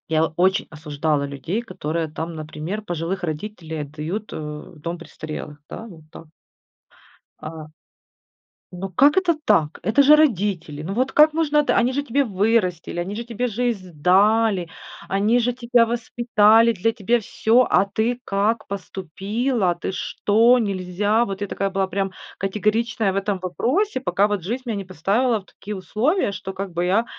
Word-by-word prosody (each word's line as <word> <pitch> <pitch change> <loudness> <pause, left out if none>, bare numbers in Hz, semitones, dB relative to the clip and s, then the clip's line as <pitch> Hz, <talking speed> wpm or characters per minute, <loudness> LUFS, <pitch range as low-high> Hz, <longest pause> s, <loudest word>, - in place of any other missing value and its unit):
Я 160 0 +3
очень 185 +5 +1
осуждала 150 -1 -1
людей, 140 - -3
которые 165 -8 -3
там, 160 +2 -5
например, 155 +6 -5
пожилых 175 -1 -4
родителей 160 -1 -5
отдают, 155 +9 -5
э, - - -4
в 150 +2 -8
дом 170 +3 -4
престарелых, 155 -3 -8
да, 225 - -7
вот 165 -7 -13
так. - - -11 1.1
А. 155 -1 -8 1.0
Ну 190 +2 -5
как 280 - +4
это 360 -3 +3
так? 165 - +2
Это 225 +6 +4
же 290 +2 +8
родители! 200 - +1
Ну 175 +5 -4
вот 255 +5 0
как 305 +1 +6
можно 305 -2 +2
д 295 - +1
Они 245 +2 +3
же 285 +2 -1
тебе 280 +1 +1
вырастили, 195 -6 0
они 190 +4 -4
же 235 +2 -5
тебе 240 +1 -2
жизнь 225 -5 -2
дали, 195 +3 +3 0.4
они 210 +5 +2
же 245 +1 +1
тебя 240 -1 +3
воспитали, 230 -1 +3
для 225 +2 0
тебе- 235 +2 +1
всё, 230 +3 +2
а - - +5
ты 220 +5 -1
как 210 +2 0
поступила? 195 - -2
Ты 175 - -4
что? 225 +5 +3
Нельзя! 205 +1 0
Вот 195 -1 -6
я 205 - -1
такая 195 +1 -2
была 195 0 0
прям 195 0 -2 0.3
категоричная 215 +2 0
в 190 - -2
этом 195 -1 -1
вопросе, 260 - 0
пока 205 -4 +1
вот 205 -2 -1
жизнь 235 +9 -4
меня 225 -4 -2
не 195 - -5
поставила 205 - 0
в - - -25
такие 210 +2 -8
условия, 215 - 0
что 190 -1 -6
как 195 0 -5
бы 175 +1 -1
я, 200 +6 +2
200 Hz, 165 wpm, -22 LUFS, 175-230 Hz, 1.1 s, же